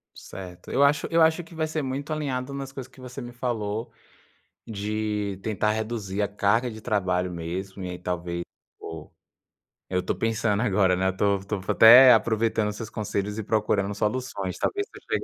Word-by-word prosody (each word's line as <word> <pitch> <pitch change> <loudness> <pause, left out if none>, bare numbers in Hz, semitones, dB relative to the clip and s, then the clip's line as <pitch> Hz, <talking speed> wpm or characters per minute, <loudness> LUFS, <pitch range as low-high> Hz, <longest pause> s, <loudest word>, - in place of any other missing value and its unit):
Certo. 90 -2 -10
Eu 140 - +3
acho 145 +1 +3
eu 165 0 +4
acho, 160 +2 +4
que 170 +1 -15
vai 160 0 -1
ser 155 0 -2
muito 140 +3 -4
alinhado, 140 -3 -2
nas 135 -1 -5
coisas 135 -2 -8
que - - -19
você 125 +1 -8
me 120 0 -7
falou, 115 -3 -3 0.8
de 105 -1 -2
tentar 105 0 0
reduzir 110 -3 -3
a 100 - +2
carga 105 +4 +1
de 110 -1 -8
trabalho 90 -5 0
mesmo, 95 +3 -5
e 90 - -4
ai 90 - -5
talvez, 85 -1 -3 0.4
o 80 -2 -8 0.8
eu 90 0 0
to - - -1
pensando 110 -2 0
agora, 95 -5 +3 0.2
estou 100 +1 +1
estou 100 0 -4
até, 125 +3 +9
aproveitando 110 -1 +1
os 105 - -5
seus 110 - -6
conselhos 105 -1 -3
e - - -3
procurando 105 -2 0
soluções. 105 -5 -2
Talvez, 405 0 -1
se - - -14
eu - - -14 0.2
chegar - - -7
110 Hz, 180 wpm, -26 LUFS, 100-125 Hz, 0.8 s, até